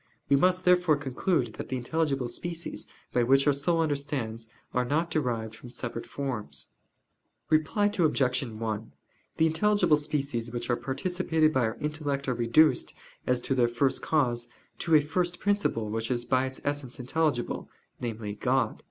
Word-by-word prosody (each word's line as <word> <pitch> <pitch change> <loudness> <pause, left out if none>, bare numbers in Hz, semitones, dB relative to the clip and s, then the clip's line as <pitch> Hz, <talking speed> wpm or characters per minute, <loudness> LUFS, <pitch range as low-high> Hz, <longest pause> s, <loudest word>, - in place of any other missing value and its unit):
We 140 - +6
must 180 +5 +3
therefore 180 -4 +5
conclude 135 - 0
that - - -5
the 130 - -1
intelligible 135 0 0
species, 170 +7 -5 0.3
by 125 - +3
which 135 +3 +4
our 145 - +5
soul 165 +4 +1
understands, 140 -7 -2 0.2
are 125 - +2
not 155 +7 0
derived 115 -7 -1
from 120 +2 -11
separate 120 -1 -5
forms. 110 - -4 0.9
Reply 155 +7 +3
Obj. 145 -10 +2
1: 110 - -4 0.4
The 160 - +4
intelligible 175 0 +3
species 140 -6 -2
which 120 0 -2
are - - +3
participated 160 +2 0
by 130 -3 +3
our 110 +1 -3
intellect 145 -2 -2
are 125 - +2
reduced, 120 +6 +3 0.3
as 125 -1 +2
to 135 - -1
their 125 -2 +3
first 120 +3 +1
cause, 120 -6 +1 0.3
to 165 - +3
a 150 - +7
first 175 +4 -1
principle 200 - 0
which 115 +1 -2
is 120 -1 -1
by 130 0 +2
its 130 - -7
essence 145 -4 -3
intelligible 130 0 -1 0.3
namely, 110 -3 -4
God. 125 +1 0
135 Hz, 160 wpm, -28 LUFS, 120-155 Hz, 0.9 s, a